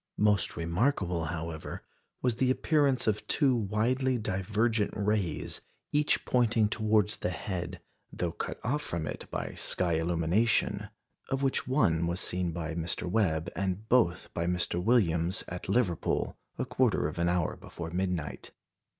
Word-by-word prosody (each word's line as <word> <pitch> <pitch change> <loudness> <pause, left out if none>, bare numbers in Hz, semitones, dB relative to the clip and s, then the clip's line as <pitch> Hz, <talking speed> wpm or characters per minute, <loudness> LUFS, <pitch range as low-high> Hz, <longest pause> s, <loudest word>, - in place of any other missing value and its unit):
Most 105 -3 +2
remarkable, 85 - 0
however, 80 -1 -5 0.4
was 125 -3 +1
the 130 0 +2
appearance 140 -1 +2
of 105 -1 0
two 135 -4 +3
widely 120 +5 +1
divergent 105 +2 0
rays, 100 -6 -1 0.3
each 150 0 +2
pointing 115 -3 +3
towards 110 -2 +2
the - - -1
head, 90 -1 -4 0.3
though 85 -1 -2
cut - - -5
off 145 +6 0
from 85 - -2
it - - -6
by - - -4
sky 85 -3 0
illumination, 95 +5 +1 0.4
of 135 0 -1
which 135 -3 +1
one 85 - +2
was 85 +1 -1
seen 90 -2 0
by 80 -1 -4
Mr. 85 +1 -1
Webb, 85 -5 +1
and 95 +4 -2
both 90 -8 +2
by 85 0 -1
Mr. 90 0 0
Williams 95 -5 +2
at 90 +1 -6
Liverpool, 100 -6 +1 0.2
a - - -1
quarter 125 - +2
of 80 - -6
an 85 0 +2
hour 90 -2 0
before 85 -1 -8
midnight. 90 -4 -2
95 Hz, 145 wpm, -30 LUFS, 85-115 Hz, 0.4 s, two